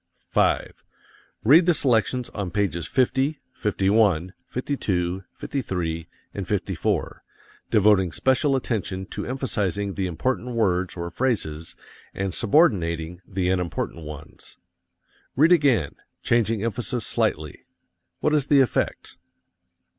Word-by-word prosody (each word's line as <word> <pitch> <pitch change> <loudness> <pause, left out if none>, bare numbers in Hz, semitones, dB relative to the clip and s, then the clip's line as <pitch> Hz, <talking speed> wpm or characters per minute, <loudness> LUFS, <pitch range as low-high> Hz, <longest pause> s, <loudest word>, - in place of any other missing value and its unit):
5. - - +1 0.6
Read 160 +9 +6
the 175 - +5
selections 125 -2 +1
on 100 -3 -4
pages 90 -4 -1
50, 135 +3 +1
51, 95 -3 +1
52, 95 -9 -2
53 85 - -3 0.3
and - - -5
54, - - -2 0.5
devoting 100 -4 +4
special 135 - +2
attention 100 -7 -2
to - - -6
emphasizing 105 -7 -2
the 95 -1 -2
important 125 +7 -2
words 95 -5 0
or 85 0 -4
phrases 85 -10 -2 0.4
and 95 -2 -2
subordinating 90 - +2
the 95 -2 -1
unimportant 85 -2 -2
ones. 75 -1 -10 0.8
Read 155 +6 +5
again, 135 - +3 0.3
changing 115 -3 +1
emphasis 120 +1 -2
slightly. 75 -1 -2 0.6
What 150 - +2
is 145 -2 +2
the 145 - +5
effect? 130 - -1
105 Hz, 110 wpm, -24 LUFS, 90-130 Hz, 0.8 s, Read